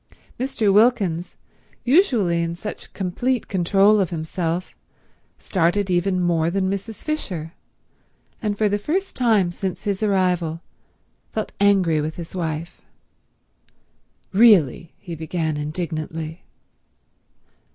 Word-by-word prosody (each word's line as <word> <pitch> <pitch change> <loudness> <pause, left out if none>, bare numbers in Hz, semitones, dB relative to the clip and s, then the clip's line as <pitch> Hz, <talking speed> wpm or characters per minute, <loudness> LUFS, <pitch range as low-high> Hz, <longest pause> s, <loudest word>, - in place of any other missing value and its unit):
Mr. 235 -6 +1
Wilkins, 200 -6 +2 0.5
usually 240 - +3
in 170 0 -2
such 210 +4 -7
complete 230 +7 -1
control 195 +3 +4
of 190 -4 +1
himself, 165 +1 -3 0.6
started 185 +2 0
even 180 +1 +1
more 170 -2 +2
than 190 +1 0
Mrs. 200 +2 -5
Fisher, 180 - -3 0.9
and 210 -3 -1
for 215 - +3
the 205 0 0
first 365 - -2
time 215 -8 +3
since 185 +1 -4
his 200 -1 -2
arrival 180 -5 +1 0.7
felt 215 - -3
angry 190 -6 +3
with 155 +1 -3
his 170 +1 -8
wife. 165 0 -4 1.5
"Really—" 190 - +5
he 175 -4 -9
began 160 0 -2
indignantly. 155 +1 -4
185 Hz, 110 wpm, -22 LUFS, 165-205 Hz, 1.5 s, Really